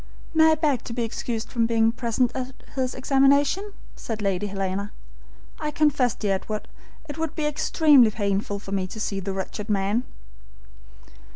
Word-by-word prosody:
"May 320 Hz, 0 st, +6 dB
I -, -, +2 dB
beg 295 Hz, -5 st, 0 dB
to 230 Hz, -, -5 dB
be 240 Hz, 0 st, -1 dB
excused 225 Hz, 0 st, -4 dB
from 230 Hz, -2 st, +1 dB
being 225 Hz, -1 st, +3 dB
present 235 Hz, +1 st, 0 dB
at 260 Hz, 0 st, -4 dB, 0.2 s
his 260 Hz, -2 st, -2 dB
examination?" 280 Hz, +9 st, +3 dB, 0.2 s
said 225 Hz, -2 st, -5 dB
Lady 200 Hz, -1 st, -1 dB
Helena. 195 Hz, +1 st, -3 dB, 0.7 s
"I 300 Hz, -, -2 dB
confess, 290 Hz, -6 st, +2 dB
dear 205 Hz, -2 st, 0 dB
Edward, 210 Hz, +2 st, -4 dB, 0.4 s
it 295 Hz, +1 st, -7 dB
would 320 Hz, -1 st, -2 dB
be 310 Hz, -, -1 dB
extremely 300 Hz, -4 st, +5 dB
painful 205 Hz, -1 st, -1 dB
for 200 Hz, -1 st, -10 dB
me 190 Hz, -2 st, -1 dB
to 220 Hz, -, -8 dB
see 200 Hz, -2 st, -2 dB
the 195 Hz, +1 st, -4 dB
wretched 195 Hz, +2 st, -5 dB
man." 200 Hz, +3 st, +1 dB
230 Hz, 165 wpm, -25 LUFS, 205-280 Hz, 0.7 s, May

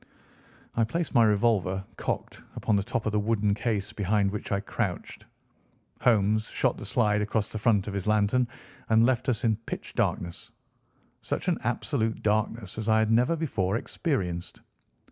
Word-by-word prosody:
I 115 Hz, -, +3 dB
placed 165 Hz, +8 st, -2 dB
my 120 Hz, -, +6 dB
revolver, 100 Hz, -3 st, +2 dB
cocked, -, -, -4 dB
upon 110 Hz, -, +1 dB
the 100 Hz, -, +2 dB
top 110 Hz, +3 st, -3 dB
of 110 Hz, -, +1 dB
the 105 Hz, -, +1 dB
wooden 105 Hz, -1 st, +1 dB
case 105 Hz, -2 st, -2 dB
behind 100 Hz, 0 st, +1 dB
which 105 Hz, -, -5 dB
I 100 Hz, -, +2 dB
crouched. 100 Hz, -, -4 dB, 0.8 s
Holmes 110 Hz, -2 st, +3 dB
shot -, -, 0 dB
the -, -, -7 dB
slide 105 Hz, -3 st, +2 dB
across 105 Hz, 0 st, -1 dB
the 110 Hz, -, -5 dB
front 105 Hz, -3 st, +3 dB
of 105 Hz, -, -4 dB
his 100 Hz, 0 st, -3 dB
lantern 110 Hz, +4 st, +3 dB, 0.4 s
and 110 Hz, +1 st, +5 dB
left 130 Hz, 0 st, +1 dB
us 115 Hz, -4 st, 0 dB
in 110 Hz, -3 st, +2 dB
pitch 115 Hz, -, -7 dB
darkness—such 85 Hz, -1 st, -5 dB
an -, -, +1 dB
absolute 110 Hz, 0 st, -1 dB
darkness 110 Hz, -1 st, -1 dB
as 110 Hz, 0 st, -2 dB
I 110 Hz, -, +5 dB
have 110 Hz, 0 st, +2 dB
never 125 Hz, +8 st, +3 dB
before 115 Hz, -, 0 dB
experienced. 90 Hz, -, -3 dB
110 Hz, 165 wpm, -27 LUFS, 100-115 Hz, 0.8 s, my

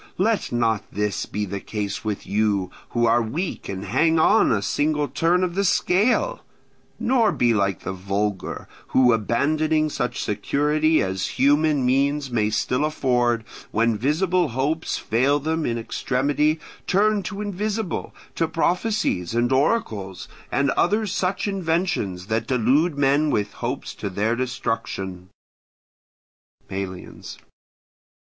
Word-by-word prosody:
Let 215 Hz, +3 st, +1 dB
not 115 Hz, -3 st, +1 dB
this 105 Hz, -2 st, -2 dB
be 105 Hz, +2 st, -3 dB
the 100 Hz, 0 st, -4 dB
case 100 Hz, -1 st, -4 dB
with 105 Hz, -2 st, -3 dB
you, 100 Hz, -3 st, 0 dB, 0.2 s
who 120 Hz, -1 st, +1 dB
are 115 Hz, +1 st, +4 dB
weak 155 Hz, -, -4 dB
and 95 Hz, 0 st, -5 dB
hang 160 Hz, -, +2 dB
on 205 Hz, +7 st, +4 dB
a 100 Hz, -3 st, +1 dB
single 150 Hz, +6 st, 0 dB
turn 175 Hz, +5 st, +1 dB
of 180 Hz, -2 st, -1 dB
the 200 Hz, +2 st, 0 dB
scale; 225 Hz, -, +2 dB, 0.6 s
nor 235 Hz, -4 st, +3 dB
be 120 Hz, -1 st, +2 dB
like 100 Hz, -3 st, 0 dB
the -, -, -4 dB
vulgar, 100 Hz, +1 st, -3 dB, 0.2 s
who, 125 Hz, -2 st, +4 dB
abandoning 155 Hz, +8 st, +1 dB
such 125 Hz, -3 st, -2 dB
security 150 Hz, +9 st, +1 dB
as 95 Hz, 0 st, -2 dB
human 145 Hz, 0 st, +3 dB
means 140 Hz, +2 st, +1 dB
may 110 Hz, -3 st, +1 dB
still 125 Hz, +5 st, 0 dB
afford, 125 Hz, -6 st, +1 dB, 0.3 s
when 115 Hz, +1 st, +1 dB
visible 165 Hz, -, +1 dB
hopes 140 Hz, +6 st, -1 dB
fail 135 Hz, +6 st, +1 dB
them 160 Hz, +2 st, -1 dB
in 120 Hz, -, -1 dB
extremity, 145 Hz, +6 st, 0 dB, 0.3 s
turn 205 Hz, +2 st, +3 dB
to 195 Hz, +1 st, -6 dB
invisible, 210 Hz, -1 st, -3 dB, 0.2 s
to 165 Hz, -, 0 dB
prophecies 170 Hz, -, 0 dB
and 120 Hz, +1 st, +1 dB
oracles, 110 Hz, -, 0 dB, 0.2 s
and 140 Hz, 0 st, +2 dB
other 210 Hz, +4 st, +2 dB
such 190 Hz, 0 st, -1 dB
inventions 165 Hz, -, -1 dB
that 110 Hz, +2 st, -1 dB
delude 140 Hz, +6 st, +2 dB
men 145 Hz, +2 st, +3 dB
with 105 Hz, -6 st, -1 dB
hopes -, -, -4 dB
to -, -, -5 dB
their 105 Hz, +5 st, 0 dB
destruction. 95 Hz, -7 st, -3 dB, 1.4 s
Melians. 95 Hz, -1 st, -6 dB
130 Hz, 130 wpm, -23 LUFS, 105-160 Hz, 1.4 s, are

